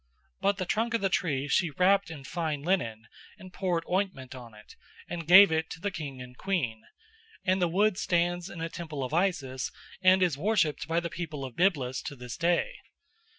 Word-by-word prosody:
But 200 0 +1
the 185 - -2
trunk 230 +5 0
of 230 - 0
the 195 - +2
tree 145 -7 0
she 170 +3 +2
wrapped 185 +5 +3
in 155 -4 -8
fine 155 -1 -3
linen, 115 - -1 0.3
and 185 -3 -13
poured 175 -3 -1
ointment 180 -9 -2
on 120 -4 -11
it, 105 - -15 0.3
and 170 -2 -6
gave 190 +1 +9
it 160 0 0
to - - -7
the 200 +3 -2
king 140 -7 -6
and 125 0 -13
queen, 135 - -2 0.6
and 185 0 +2
the 175 - +3
wood 195 +3 +2
stands 175 +1 0
in 175 - -8
a 165 - -1
temple 160 -4 -6
of 130 - -5
Isis 155 -8 0 0.3
and 185 0 +5
is 165 -6 0
worshipped 185 -7 +1
by 165 +1 +1
the 170 -1 -5
people 155 -5 -5
of 125 -3 -9
Byblus 140 -9 +1
to 145 - -5
this 125 -2 -7
day. 175 - 0
170 Hz, 195 wpm, -29 LUFS, 140-185 Hz, 0.6 s, gave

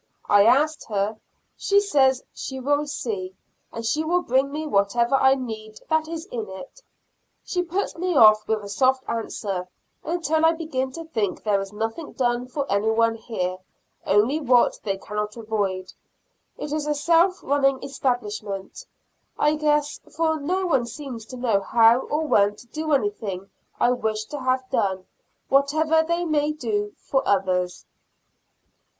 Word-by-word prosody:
I 205 0 +6
asked 300 +5 +3
her; 210 +1 -2 0.4
she 400 0 +3
says 270 -10 +2
she 265 -1 -6
will 290 +3 0
see, 195 -9 -4 0.4
and 230 0 -6
she 300 +7 +1
will 350 +3 +1
bring 265 +3 +1
me 310 +2 -4
whatever 235 0 +1
I 265 0 +5
need 220 -4 -7
that 315 0 +2
is 330 0 -5
in 225 -4 -4
it. 230 - -10 0.6
She 360 - -1
puts 360 +3 -2
me 360 0 -1
off 215 -4 +6
with 220 -1 0
a - - -7
soft 260 +5 +2
answer, 200 -5 -3 0.4
until 320 -1 0
I 325 0 +5
begin 310 -6 -3
to 330 - -6
think 215 - -2
there 205 -2 +2
is 195 0 -7
nothing 225 +9 -4
done 245 -1 0
for 275 +2 -3
any 200 +2 +1
one 230 +1 +3
here, 185 -5 -4 0.4
only 225 +10 +2
what 250 -3 +3
they 195 -3 -2
cannot 210 +2 -4
avoid. 200 -4 -2 0.6
It 295 - -5
is 305 -1 -2
a 300 - +1
self 335 +5 +3
running 275 -1 +1
establishment, 215 -7 -3 0.5
I 300 +1 +3
guess, 300 -1 +1 0.2
for 320 -1 +1
no 365 +6 -1
one 265 -9 +1
seems 240 -4 -8
to 255 - -8
know 235 -5 +2
how 230 +4 +5
or 300 +4 -2
when 205 -7 +3
to 240 - -15
do 310 +5 -4
anything 205 -5 -2 0.3
I 245 - +4
wish 220 -3 -1
to 290 - -3
have 255 0 0
done, 190 -2 0 0.4
whatever 310 +4 +3
they 340 +2 -1
may 305 -2 +1
do 210 -7 -2
for 270 - 0
others. 185 -2 0
255 Hz, 160 wpm, -24 LUFS, 210-300 Hz, 0.6 s, I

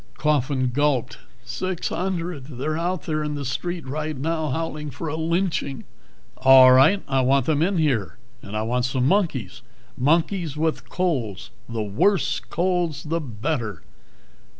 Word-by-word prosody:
Coffin 135 -4 +1
gulped. 130 - 0 0.3
"Six 185 -2 -3
hundred. 175 -6 -3
They're 145 +3 -3
out 175 +2 -2
there 155 -1 -2
in 150 -1 -3
the 140 -1 -4
street 170 +6 -3
right 155 +2 -3
now, 160 +2 -1
howling 150 +1 -3
for 145 +5 -6
a 155 - -3
lynching." 160 -4 -1 0.5
"All 130 -1 +8
right, 135 +10 +5
I 135 -1 +2
want 135 0 +3
them 150 -1 +1
in 185 +3 +1
here. 135 - 0 0.2
And 105 +2 -6
I 110 - -1
want 120 +2 0
some 130 0 0
monkeys. 145 - 0 0.3
Monkeys 160 +3 +1
with 160 0 -1
colds, 135 - -2 0.2
the 115 -2 -2
worse 140 - +1
colds 175 -2 -1
the 165 +2 -1
better." 115 - -3
150 Hz, 150 wpm, -23 LUFS, 130-165 Hz, 0.5 s, All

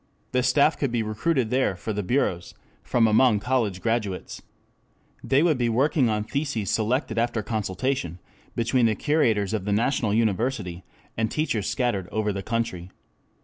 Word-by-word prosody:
The 125 - +2
staff 140 +5 +3
could 140 -4 0
be 115 -2 0
recruited 110 +3 0
there 130 -6 +1
for 105 +5 -4
the 105 - -2
bureaus 90 -5 -1 0.3
from 120 -2 +2
among 110 0 +4
college 110 -6 -1
graduates. 110 -5 -2 0.8
They 135 +3 +3
would 155 -6 +2
be 120 -1 +1
working 130 +2 +2
on 105 -1 0
theses 135 -5 -2
selected 115 +1 0
after 115 -2 0
consultation 105 -2 -2 0.4
between 120 +1 +2
the 110 - +1
curators 110 -8 +1
of 105 -4 -2
the 105 - -1
national 110 -1 +1
university 110 -4 -1 0.3
and 110 0 0
teachers 120 -10 -1
scattered 110 -8 -1
over 105 -1 -1
the 100 - -4
country. 105 -5 -3
115 Hz, 155 wpm, -25 LUFS, 105-130 Hz, 0.8 s, among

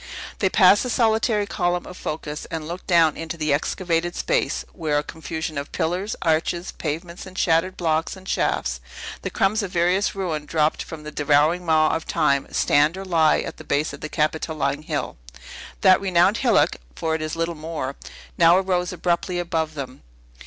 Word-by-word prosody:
They 190 - +2
passed 195 +1 +6
the 250 - -2
solitary 220 -2 +2
Column 175 -2 -1
of 180 - -9
Phocas, 150 -2 -5
and 160 -2 -5
looked 175 +2 -7
down 165 -4 +4
into 165 +1 -6
the 155 -2 +1
excavated 170 +3 -1
space, - - 0
where 155 -4 -1
a 145 - 0
confusion 160 0 -5
of 140 - -7
pillars, 185 +6 -2
arches, 170 +2 0
pavements, 170 +4 -5
and 185 0 -12
shattered 170 +2 +2
blocks 160 0 0
and 190 0 -14
shafts 65 - 0 0.4
the - - -3
crumbs 210 +3 +1
of 200 - -4
various 180 +4 +1
ruin 160 -6 -3
dropped 155 -1 +1
from 160 -2 -8
the 150 - -7
devouring 150 +5 +2
maw 155 -1 +4
of 160 - -5
Time 145 -4 +1
stand, 150 +5 +3
or 195 - -6
lie, 165 -4 +3
at - - -7
the - - -10
base 150 +2 0
of - - -10
the 155 - -5
Capitoline 150 -2 -1
Hill. 155 - -4 0.6
That 185 0 +6
renowned 190 +2 +3
hillock 205 - +3 0.2
(for 160 -1 -1
it 160 - -1
is 155 +1 -3
little 165 +1 -1
more) 155 -4 -5 0.4
now 170 +1 +7
arose 180 -2 0
abruptly 175 +1 -1
above 160 -3 -2
them. 130 -3 -7
165 Hz, 180 wpm, -23 LUFS, 155-180 Hz, 0.6 s, now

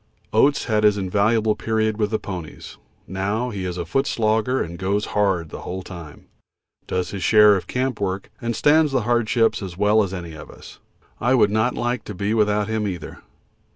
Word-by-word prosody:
Oates 145 0 +3
had 110 -2 +1
his 105 -1 +4
invaluable 105 +3 +1
period 110 -1 -1
with 105 -1 +1
the 110 - 0
ponies; 90 -7 -8 0.3
now 100 +6 -2
he 95 -3 -4
is 90 -1 -4
a 85 - -3
foot 135 - 0
slogger 110 +3 +1
and 85 +1 -4
goes 100 +2 0
hard 95 -6 +1
the - - -8
whole 95 +1 -5
time, 85 -6 -11 0.6
does 90 -1 -2
his 100 -2 -5
share 105 -1 +6
of 95 - -4
camp 125 -3 -2
work, 95 +1 -3
and 115 -1 -2
stands 150 +2 +4
the 130 -2 +1
hardship 120 -1 +1
as 90 -3 -7
well 105 +2 +4
as 100 -3 -2
any 85 -3 -6
of 80 - -10
us. - - -13 0.4
I 125 +3 +2
would 105 -4 +4
not 110 +3 +1
like 120 +1 -2
to 105 - -7
be 100 +3 -1
without 105 -2 +2
him 110 -1 -1
either. 90 -5 -6
105 Hz, 195 wpm, -22 LUFS, 95-115 Hz, 0.6 s, share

